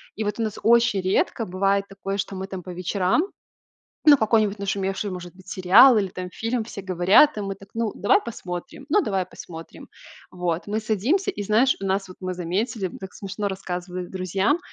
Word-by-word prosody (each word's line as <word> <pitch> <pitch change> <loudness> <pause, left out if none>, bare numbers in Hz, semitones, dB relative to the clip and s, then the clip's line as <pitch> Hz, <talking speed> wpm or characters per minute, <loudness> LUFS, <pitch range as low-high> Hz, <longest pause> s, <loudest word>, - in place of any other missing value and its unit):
И 220 - -2
вот 210 +2 -3
у - - +1
нас 215 -2 -4
очень 235 -3 +4
редко 190 +4 0
бывает 195 +1 +1
такое, 195 0 -5
что 195 0 -3
мы, 190 0 -5
там, 190 -1 -6
по 180 - -8
вечерам 185 - +1 0.8
Ну 290 -1 +9
какой-нибудь 215 -3 +2
нашумевший, 195 0 -2
может 180 -2 -7
быть, 185 0 -17
сериал 200 +8 +6
или, 195 -3 0
там, 180 0 -6
фильм, 230 +4 -2
все 215 -2 -8
говорят, 185 - +5
и - - -2
мы 195 -1 -4
так: 195 0 -16
"Ну, 225 -2 -1
давай 400 - +3
посмотрим?" 180 +3 -7
"Ну 410 +8 +4
давай 195 - -1
посмотрим". 165 -2 -11 0.4
Вот. 175 -2 -2
Мы 210 +1 -1
садимся 225 - 0
и, 205 - -6
знаешь, 225 +6 +3
у - - -3
нас 195 0 0
вот 185 - -12
мы 185 -1 -4
заметили, 195 +5 -2
м, 180 - -6
так 190 -1 -9
смешно 200 +1 -4
рассказывали 180 -2 -5
друзьям, 190 - 0
195 Hz, 195 wpm, -24 LUFS, 185-220 Hz, 0.8 s, Ну